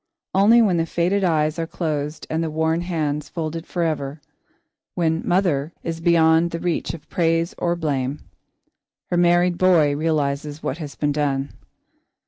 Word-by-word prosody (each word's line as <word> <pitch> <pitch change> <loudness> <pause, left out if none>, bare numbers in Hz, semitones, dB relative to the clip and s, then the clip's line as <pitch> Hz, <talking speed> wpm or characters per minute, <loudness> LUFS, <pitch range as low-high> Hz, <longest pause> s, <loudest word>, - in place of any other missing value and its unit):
Only 220 +5 +6
when 190 -5 +2
the 165 0 0
faded 180 +5 0
eyes 155 -2 +1
are 165 - -2
closed 150 -3 -3
and 160 +1 -1
the 160 - -2
worn 160 +2 0
hands 155 -4 -2
folded 165 0 -4
forever; 155 -4 -2 0.8
when 165 -2 +1
"mother" 175 -4 +1
is 165 -1 -4
beyond 165 0 +4
the 170 - -4
reach 175 -1 -2
of 160 - -14
praise 165 -1 0
or 175 0 0
blame, 145 -4 -2 0.9
her 175 - +1
married 175 0 +3
boy 165 -6 +4
realises 150 -1 -1
what 145 - -3
has 150 -3 -7
been 145 -1 0
done. 140 -2 -1
165 Hz, 150 wpm, -22 LUFS, 150-175 Hz, 0.9 s, Only